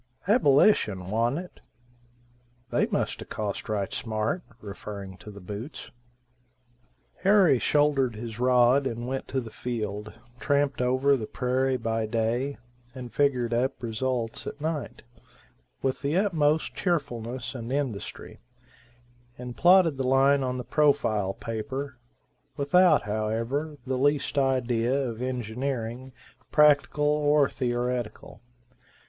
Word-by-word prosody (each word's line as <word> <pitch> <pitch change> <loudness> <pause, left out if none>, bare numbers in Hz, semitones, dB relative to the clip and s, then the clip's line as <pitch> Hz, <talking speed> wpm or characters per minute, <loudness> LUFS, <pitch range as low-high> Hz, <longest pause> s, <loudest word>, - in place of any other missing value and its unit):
"Abolish'n 140 - +3
wan't 115 +5 +1
it? 180 +1 -8 1.1
They - - +2
must - - -2
a - - -7
cost 105 -1 -4
right 100 -2 -2
smart," 110 +8 -2 0.2
referring 100 -2 -8
to 105 - -12
the 100 -1 -10
boots. 105 +9 -8 1.3
Harry 190 - +4
shouldered 140 -5 +2
his 115 0 -7
rod 125 +2 +4
and 120 0 -4
went 130 +1 -3
to 130 - -1
the 115 -3 -7
field, 105 -4 -4 0.3
tramped 140 -1 +1
over 130 +3 +3
the 110 -5 -4
prairie 130 +1 0
by 115 -2 -2
day, 115 +5 -1 0.4
and 125 -2 -8
figured 125 -5 +1
up 125 +2 -1
results 115 0 -2
at 145 - -6
night, 155 -4 -4 0.8
with 130 -1 -1
the 145 +4 0
utmost 160 -6 +1
cheerfulness 125 - -2
and 120 -1 -6
industry, 135 -7 -4 1.0
and 125 -1 -7
plotted 175 -4 +5
the 135 - -1
line 135 +2 +4
on 130 -1 -2
the 125 - -4
profile 115 -10 +1
paper, 130 +4 -5 0.6
without, 155 +2 +4
however, 115 +8 -2
the 130 -1 -1
least 145 +1 +1
idea 125 -2 +1
of 120 -4 -3
engineering 125 0 -3 0.4
practical 150 0 +4
or 150 -1 +3
theoretical. 120 -3 -3
130 Hz, 120 wpm, -27 LUFS, 115-140 Hz, 1.3 s, plotted